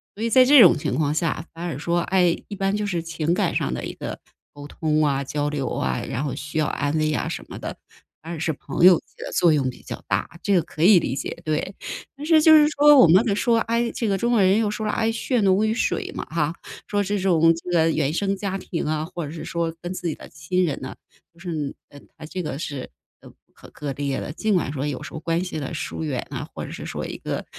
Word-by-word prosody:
所 215 - -5
以 230 - 0
在 255 +2 +7
这 285 +2 +7
种 185 -8 +8
情 - - -2
况 150 -2 +1
下 160 0 -1
反 165 +1 -8
而 165 -6 -3
说， 170 +3 0
哎， 180 -1 +2
一 205 - -6
般 195 +1 0
就 210 0 -2
是 175 -4 -2
情 165 0 -1
感 - - 0
上 - - 0
的 - - -4
一 - - -5
个 - - -6 0.3
沟 145 0 -10
通 155 0 0
啊、 140 -1 0
交 145 +2 -2
流 145 -3 -2
啊， - - -2
然 130 +1 -2
后 140 - -3
需 150 +1 -6
要 155 - +2
安 145 +1 -1
慰 155 0 +1
啊 - - -1
什 - - -5
么 - - -8
的， - - -6 0.4
反 165 +2 -7
而 165 - -5
是 160 +1 -1
朋 145 +2 -4
友 185 -2 +9
起 - - -27 0.2
的 - - -6
作 170 -3 +4
用 135 -4 +1
比 125 - -11
较 - - -8
大， - - 0 0.2
这 200 - +1
个 180 - +4
可 155 - -4
以 185 -1 +8
理 130 - -2
解， - - -4
对。 155 +5 -1 0.4
但 290 - -7
是 320 -1 +5
就 315 +1 +7
是 300 -1 +7
说， 295 0 +6
我 255 - +8
们 185 +7 +6
的 215 - +1
说， 230 +3 +2
哎， 235 +1 0
这 225 - -2
个 195 - +1
中 235 +4 0
国 225 - +4
人 190 +1 +4
又 220 -2 +1
说 215 +1 -4
了， 210 - 0
哎， 225 - 0
“血 245 +2 0
浓 195 +1 +3
于 220 - +1
水” - - -1
嘛 - - -5
哈， 155 -1 0 0.3
说 205 -1 0
这 205 +1 -1
种 165 -4 +4 0.2
是 165 -2 +3
原 145 -2 0
生 195 +3 0
家 195 -1 -3
庭 175 -3 -4
啊， 155 0 -1
或 170 -1 -6
者 145 - -7
是 160 - -7
说 170 -1 -2
跟 175 +1 -4
自 180 - -4
己 155 - -3
的 - - -12
亲 180 +4 -1
人 150 -5 -2
呢， 130 - -7 0.4
就 170 - -23
是， 160 -6 -4 0.2
呃， 145 - -14 0.2
它 155 - -9
这 180 +3 -5
个 145 -2 -4
是， 145 -5 -5 0.3
呃， - - -13
不 - - -21 0.2
可 - - -15
割 145 -2 -5
裂 140 -1 -2
的。 - - -5
尽 215 +5 0
管 175 -7 +1
说 140 0 -3
有 135 -3 -4
时 - - -9
候 160 - -5
关 165 +1 -1
系 180 -4 -4
的 145 +3 -5
疏 160 - -4
远 140 -6 -3
啊， - - -5
或 - - -5
者 - - -9
是 - - -7
说 - - -5
一 - - -6
个 - - -4
170 Hz, 290 characters per minute, -23 LUFS, 150-200 Hz, 0.4 s, 友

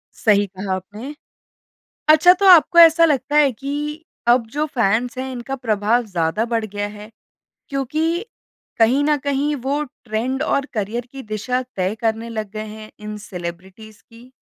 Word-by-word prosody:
सही 205 -2 +3
कहा 190 0 -5
आपने। 210 +10 -8 0.9
अच्छा 315 +4 +7
तो 395 +2 -1
आपको 340 -1 +7
ऐसा 330 0 +8
लगता 290 -1 0
है 290 -2 +5
कि 275 +4 -6 0.5
अब 240 0 +4
जो 300 +1 +1
फैन्स 240 -3 0
है 260 +1 -4
इनका 255 +2 -5
प्रभाव 230 -1 0
ज़्यादा 180 +2 -1
बढ़ 225 -1 0
गया 205 0 -4
है 210 +1 -11 0.6
क्योंकि 275 +3 -1 0.7
कहीं 245 +5 +4
न 300 0 +2
कहीं 285 +1 0
वो 285 +2 0
ट्रेंड 250 0 -4
और 280 -3 0
करिअर 225 +3 -3
की 270 -1 -8
दिशा 250 +4 -1
तय 190 +2 -1
करने 225 0 -1
लग 215 -3 -4
गए 215 0 -5
हैं 215 0 -10
इन 210 0 -7
सेलेब्रिटीज 190 +4 -9
की? 235 +2 -18
235 Hz, 160 wpm, -20 LUFS, 210-275 Hz, 0.9 s, ऐसा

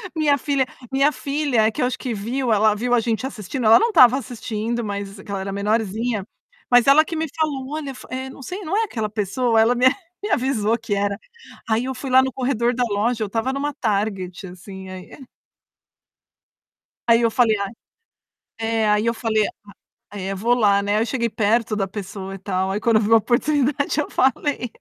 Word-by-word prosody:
Minha 300 -3 +3
filha 280 -1 0 0.3
minha 275 +2 +3
filha 280 -4 0
é - - 0
que - - -4
eu - - +3
acho 250 - -2
que 250 -3 -4
viu. 235 +5 -2
Ela 215 0 +4
viu 245 +3 -1
a 245 - +5
gente 225 +1 -1
assistindo, 245 0 -5
ela 220 +1 +8
não 460 +3 +2
estava 255 - +6
assistindo, 235 -2 -4
mas 200 -1 -5
que 200 - -10
ela 195 - -2
era 195 +1 -4
menorzinha. 215 +1 -1 0.4
Mas 245 0 +5
ela 285 +3 +7
que 330 - -5
me 320 0 -1
falou 285 -5 -2
"Olha, 295 -3 -4
fo - - -12
eh, 260 +1 -4
não 265 - -12
sei, 365 +9 -6
não 330 +6 -2
é 450 - +2
aquela 220 - -3
pessoa?". 225 +3 0
Ela 225 +3 +4
me 250 +1 +2 0.4
me 415 - -3
avisou 240 - +1
que 225 -2 -2
era. 200 0 -1 0.5
Aí, 225 +3 +1
eu 265 - -3
fui 265 +1 -6
lá 260 +1 +6
no 260 -1 -3
corredor 245 -2 0
da 250 +1 0
loja, 220 +3 0
eu 210 - -4
tava 225 +5 -1
numa 285 +2 -2
Target, 200 -5 -2
assim, 190 +1 -10
aí, 185 -1 -9
eh 265 - -13 1.8
Aí, 230 0 +6
eu 230 -1 +2
falei: 225 -3 +3
"A". 200 -1 -3 0.9
É, 225 -1 0
aí 210 +1 +2
eu 230 - +3
falei: 225 -2 0 0.7
"A 205 - -8
eh, 195 +1 -3
vou 230 +5 +2
lá, 205 -4 +3
né". 205 +1 +1
Eu - - +2
cheguei 235 -2 -1
perto 220 0 +1
da 195 -2 0
pessoa 195 -1 -7
e 195 - -8
tal, 190 0 -2
aí 205 - -2
quando 230 -1 +3
eu 215 - +3
vi 215 +2 0
a - - +9
oportunidade 280 +5 +1
eu 300 - -4
falei. 265 -2 0
230 Hz, 210 wpm, -22 LUFS, 205-260 Hz, 1.8 s, a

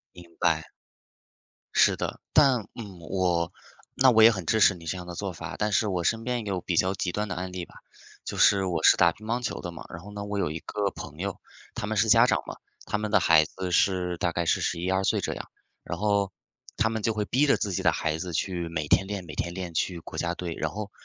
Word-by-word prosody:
明 90 - -11
白。 80 -1 +1 1.0
是 - - +5
的， - - -4
但 135 -7 +4
嗯， 100 -6 -9
我 90 -3 +1 0.4
那 130 -1 +6
我 110 -1 +5
也 115 - +10
很 95 -6 -4
支 110 - +2
持 100 - +6
你 85 -2 -13
这 90 - -2
样 90 -1 -8
的 90 - -7
做 100 0 -3
法， 85 0 -7
但 105 0 0
是 105 +2 +2
我 90 -3 -1
身 115 +6 0
边 120 -2 -2
有 95 -2 -2
比 90 - -2
较 95 +3 +2
极 90 -2 -2
端 105 +2 -2
的 90 - -4
案 90 +1 -4
例 90 -2 -5
吧。 - - -20 0.5
就 - - -5
是 95 -1 +5
我 85 -3 -2
是 - - +7
打 85 -1 +5
乒 110 - -14
乓 120 +3 -1
球 125 - -3
的 85 - -5
嘛， 80 - -9
然 85 - -8
后 105 - -10
呢 100 0 -5
我 100 0 -4
有 75 - 0
一 80 - -4
个 100 -2 -2
朋 75 -1 -9
友， 95 +1 -4 0.3
他 - - -4
们 - - -2
是 - - +3
家 - - +6
长 - - +2
嘛， - - -7 0.3
他 - - -1
们 105 0 -3
的 - - +4
孩 80 -2 +5
子 90 +3 -5
是 90 -1 +2
大 90 0 0
概 85 +1 -1
是 - - +2
十 85 - -1
一 90 +2 -1
二 95 +1 +1
岁 - - +2
这 - - -2
样， - - -8 0.3
然 85 - -5
后， 100 0 +1 0.5
他 110 - +3
们 110 -1 -3
就 110 +1 +1
会 105 - -1
逼 135 +8 +2
着 - - +4
自 100 - -2
己 95 - -1
的 85 -3 +4
孩 80 0 -1
子 90 0 -4
去 85 +1 -2
每 75 -3 -3
天 95 +5 +3
练 100 -3 -5
每 75 - -9
天 85 +3 -3
练， 90 -3 -5
去 85 +2 -1
国 - - -9
家 85 0 -1
队。 85 -2 -4
然 80 - -2
后， 105 +3 -6
95 Hz, 280 characters per minute, -27 LUFS, 85-105 Hz, 1.0 s, 也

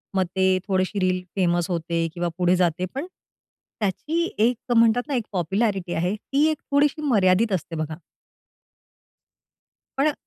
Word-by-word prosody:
मग 190 -1 +2
ते 190 0 +3 0.2
थोडीशी 190 +1 0
रील 185 -1 +1
फेमस 175 -2 +1
होते, 170 -1 -1
किंवा 175 0 -2
पुढे 180 0 +3
जाते, 180 0 +1
पण 275 +5 -3 0.7
त्याची 300 - -1
एक 240 +3 +1
म्हणतात 230 +1 +5
ना, 285 - -1
एक 235 -4 -1
पॉप्युलॅरिटी 190 0 -1
आहे, 180 +5 0
ती 275 +7 0
एक 310 - -3
थोडीशी 290 +2 +2
मर्यादित 215 -5 +3
असते, 170 -2 -3
बघा. 155 0 -4 2.0
पण 275 - +4
अ, 305 - +1
190 Hz, 145 wpm, -24 LUFS, 175-240 Hz, 2.0 s, म्हणतात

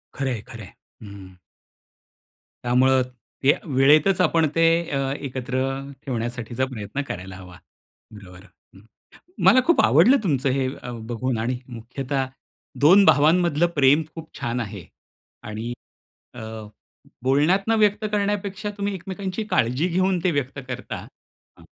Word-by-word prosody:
खरंय, 130 -5 -2
खरंय. 110 -4 -11 0.3
हं. 100 -2 -11 1.3
त्यामुळे 130 +2 +3 0.4
ते 140 - +6 0.2
वेळेतच 150 +8 +4
आपण 165 -2 +3
ते 165 - +4 0.2
अ, 135 -1 -1
एकत्र 130 -2 -4 0.5
ठेवण्यासाठीचा 120 0 -3
प्रयत्न 130 +1 -5
करायला 95 +1 -7
हवा. 90 -1 -12 0.6
बरोबर. 95 -2 -13 0.3
हं, 95 - -15 0.6
मला 255 - +7
खूप 340 - +4
आवडलं 170 - +6
तुमचं 135 -5 +1
अ, - - +1
हे 130 -1 0 0.4
बघून. 120 +1 -2
आणि 120 +2 -2
मुख्यतः 130 +3 -4 0.5
2 185 +7 +7
भावांमधलं 165 +1 +4
प्रेम 140 +2 +5
खूप 160 -1 -9
छान 120 +1 -2
आहे. 100 -5 -6 0.6
आणि 110 +3 -5 0.6
अ, 120 - -9 0.8
बोलण्यातनं 175 +12 +2
व्यक्त 210 0 +2
करण्यापेक्षा 205 0 -2
तुम्ही 200 -1 -2
एकमेकांची 190 +3 -5
काळजी 125 +9 +1
घेऊन 185 +1 +1
ते 180 - +3
व्यक्त 140 -2 -3
करता, 125 0 -6 0.5
अ, - - -18
135 Hz, 120 wpm, -23 LUFS, 120-175 Hz, 1.3 s, मला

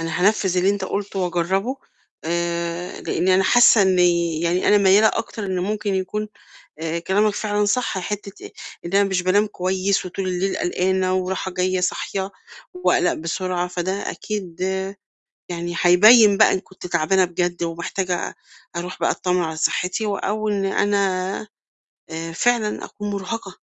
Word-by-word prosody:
أنا 165 +1 -3
هانفِّذ 195 -4 +2
اللي 185 +2 +3
أنت 200 -2 -2
قُلته 200 0 -4
واجرَّبه، 185 +7 -1 0.5
آآ 170 +1 -3
لإني 185 +1 +1
أنا 190 0 +3
حاسّة 240 -2 +6
إني 175 -3 +2
يعني 170 +2 +1
أنا 210 - +6
ميَّالة 200 +2 +5
أكتر 220 -2 -4
إن 185 -1 -2
ممكن 205 +1 -2
يكون 200 +3 -3 0.5
آآ 165 +1 -2
كلامك 205 +4 +1
فعلًا 210 -1 0
صح، 215 0 0
حتّة 200 +1 -6 0.3
إن 170 - -6
أنا 200 +1 +5
مش 190 -2 0
بانام 200 +4 +2
كويس 190 0 -1
وطول 185 +1 -4
الليل 185 +1 -1
قلقانة 185 +1 0
وراحة 185 0 -2
جاية 185 +1 0
صاحية 190 +1 -2 0.4
وأقلق 360 0 +2
بسرعة، 180 +2 -2
فده 180 +1 -3 0.2
أكيد 190 -6 -6 0.9
يعني 175 0 -4
هيبيِّن 210 +4 +7
بقى - - +5
إن 190 - 0
كنت 185 -1 -12
تعبانة 175 +2 +2
بجد 175 0 -2
ومحتاجة 170 +2 -3 0.4
أرُوح 180 +1 -5
بقى - - +2
أتطمِّن 180 -1 0
على 160 -1 -4
صحتي، 180 +6 0
و 205 -1 -1
أو 215 +2 -2
إن 200 -2 0
أنا 195 0 0 0.6
آآ 165 0 -5
فعلًا 220 +4 0
أكون 205 -1 -7
مرهقة، 200 0 -5
185 Hz, 150 wpm, -21 LUFS, 175-205 Hz, 0.9 s, هيبيِّن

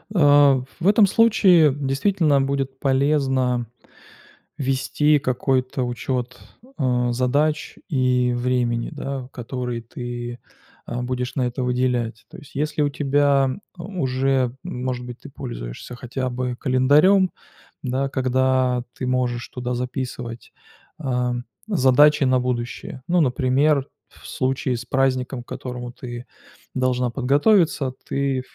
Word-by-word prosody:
А 145 -5 +5 0.2
в 175 - 0
этом 210 +1 +6
случае 190 -8 +5
действительно 145 +2 +1
будет 135 -1 -2
полезно 130 -3 +1 0.9
вести 145 +2 +2
какой-то 130 0 0
учет, 125 0 -3 0.4
а, 125 -2 +1
задач 145 +5 0
и 125 -4 +2
времени, 120 -1 0
да, 135 -4 -5
которые 125 -1 -4
ты, 120 0 -6 0.5
а, 120 +1 -4
будешь 125 0 -3
на 130 - +1
это 125 +1 -3
выделять. 125 -2 -1
То - - -12
есть, 145 - -15
если 150 +1 -1
у 145 - +1
тебя 140 -1 +2 0.3
уже, 135 -8 0
может 125 0 -4
быть, 125 -1 -9
ты - - -11
пользуешься - - -7
хотя 130 +1 -4
бы 125 0 -3
календарем, 150 +9 +4 0.5
да, 135 +1 -1
когда 130 -1 +1
ты 130 - -5
можешь 125 -1 -1
туда 125 0 -4
записывать, 125 -1 -5 0.5
ам, 125 -4 -1 0.2
задачи 150 -5 +5
на 130 0 +3
будущее. 125 0 -4
Ну, 180 +1 +2
например, 135 +1 +2 0.2
в - - -19
случае 130 0 -1
с 120 - -8
праздником, 130 -1 0
к - - -38
которому 125 -1 -6
ты 120 0 -8 0.5
должна 125 -1 +1
подготовиться, 140 - +2
ты 135 -1 0
130 Hz, 120 wpm, -22 LUFS, 125-140 Hz, 0.9 s, этом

